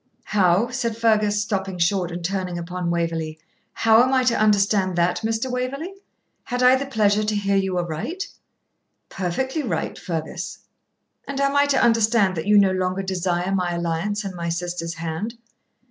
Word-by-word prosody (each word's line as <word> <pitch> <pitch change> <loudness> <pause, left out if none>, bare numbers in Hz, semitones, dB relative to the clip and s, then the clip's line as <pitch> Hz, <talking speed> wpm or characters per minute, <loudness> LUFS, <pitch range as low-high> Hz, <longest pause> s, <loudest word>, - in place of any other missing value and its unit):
'How,' 195 +2 +2
said 235 -3 -2
Fergus, 215 -2 +2
stopping 195 -3 -2
short 175 +1 +1
and 175 0 -5
turning 185 -1 -2
upon 175 +1 -4
Waverley 165 -2 -2 0.4
'how 225 0 +5
am 255 +1 +2
I 260 -1 +3
to 250 -2 +2
understand 200 -3 +2
that, 175 +1 +2
Mr. 225 +3 -1
Waverley? 275 +8 -3 0.5
Had 245 +1 -1
I 250 +1 +7
the 275 +1 -3
pleasure 215 -4 +2
to 210 0 -1
hear 200 -1 0
you 190 -2 0
aright?' 215 - -3 0.8
'Perfectly 260 - -2
right, 190 - -3
Fergus.' 160 -3 -5 0.7
'And 275 0 -4
am 275 0 +1
I 285 0 +4
to 280 - +2
understand 225 -4 +3
that 160 +2 -4
you 210 0 +6
no 195 -2 +5
longer 185 +1 -1
desire 180 0 -1
my 180 -2 0
alliance 170 +5 -2
and 195 -1 -5
my 170 -1 -4
sister's 170 0 -3
hand?' 170 +8 -4
195 Hz, 165 wpm, -23 LUFS, 175-230 Hz, 0.8 s, I